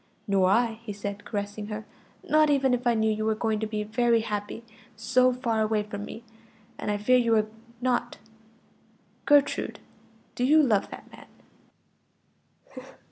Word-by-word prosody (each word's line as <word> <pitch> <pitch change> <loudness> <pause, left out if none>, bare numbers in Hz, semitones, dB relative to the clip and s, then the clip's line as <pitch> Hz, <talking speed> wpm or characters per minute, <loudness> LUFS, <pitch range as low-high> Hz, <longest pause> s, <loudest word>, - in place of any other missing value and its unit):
"Nor 195 -2 +3
I," 225 +1 +2
he 225 -3 -6
said, 200 0 -6
caressing 205 0 -4
her; 215 0 -6 0.4
"not 310 0 +4
even 270 -3 +2
if 250 0 -1
I 235 - +3
knew 220 0 +2
you 215 0 -2
were 220 0 +1
going 220 -1 -1
to 220 - -2
be 210 -1 -3
very 230 +2 +2
happy 210 +1 -5 0.3
so 255 +4 +3
far 235 -3 -1
away 215 -1 +1
from 205 0 -7
me; 230 - -9 0.6
and - - -4
I 205 - 0
fear 250 +5 +3
you 230 -2 +2
are 215 -1 +3 0.4
not. 250 -1 -1 1.1
Gertrude, 290 -1 +3 0.6
do 245 - -3
you 305 +4 +5
love 215 -7 +1
that - - -10
man?" 255 0 -20
220 Hz, 160 wpm, -26 LUFS, 210-250 Hz, 1.1 s, you